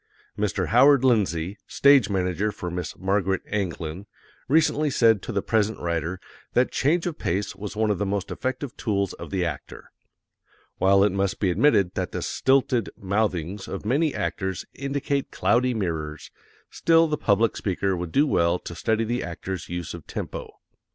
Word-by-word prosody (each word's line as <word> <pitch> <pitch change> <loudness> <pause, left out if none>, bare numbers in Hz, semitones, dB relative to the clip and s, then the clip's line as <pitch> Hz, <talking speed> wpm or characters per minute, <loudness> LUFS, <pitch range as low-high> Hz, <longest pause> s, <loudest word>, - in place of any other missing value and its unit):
Mr. 105 -3 -1
Howard 135 +3 +6
Lindsay, 100 -6 +1
Stage 140 -6 +5
Manager 95 +2 0
for 90 -3 -6
Miss 90 -3 -5
Margaret 95 0 0
Anglin, 90 -2 -3 0.4
recently 155 0 +3
said 115 -6 +4
to - - -6
the 100 -3 -1
present 110 -1 +1
writer 85 +1 -2 0.3
that 125 +1 +2
change 165 +5 +1
of 170 -3 -4
pace 95 +3 -2
was 105 +1 -7
one 110 0 +1
of 100 - -1
the 100 - 0
most 100 -1 -2
effective 130 0 -4
tools 100 -4 -1
of - - -9
the 95 -2 -1
actor. 75 -5 -7 0.9
While 95 +1 +5
it 105 - +3
must 100 0 -1
be 95 -3 +2
admitted 100 -4 +3
that - - -3
the - - -3
stilted 130 -4 +1
mouthings 95 -2 -2
of - - -6
many 145 +7 +2
actors 95 -2 -3
indicate 140 0 -2
cloudy 125 +1 +1
mirrors, 80 -7 -4 0.4
still 165 0 +4
the 155 - 0
public 110 -4 +2
speaker 95 0 -1
would 85 -2 -5
do 145 - +4
well 85 - +2
to 85 - -8
study 110 +5 0
the 120 +2 -1
actor's 85 +1 -6
use 85 -2 -4
of 85 -3 -10
tempo. - - -6
100 Hz, 165 wpm, -25 LUFS, 90-125 Hz, 0.9 s, Howard